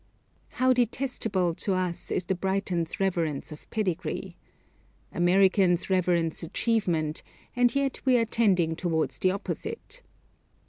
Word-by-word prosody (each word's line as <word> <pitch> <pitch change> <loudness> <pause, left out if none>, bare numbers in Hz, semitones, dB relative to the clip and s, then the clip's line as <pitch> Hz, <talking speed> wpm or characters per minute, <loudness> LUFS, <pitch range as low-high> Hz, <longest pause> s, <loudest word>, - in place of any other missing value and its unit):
How 255 0 +4
detestable 225 -7 0
to 190 +3 0
us 180 -2 -3
is 180 - -1
the 190 - 0
Briton's 185 -3 -2
reverence 170 -7 -1
of 150 - -12
pedigree. 185 -5 -3 0.8
Americans 185 0 +3
reverence 175 -3 +1
achievement, 170 -4 0 0.3
and 245 0 +3
yet 275 -2 -1
we 255 -2 +4
are 230 - +2
tending 185 -8 +2
towards 160 -2 -1
the 185 - +3
opposite. 445 - -5
185 Hz, 120 wpm, -27 LUFS, 170-225 Hz, 0.8 s, How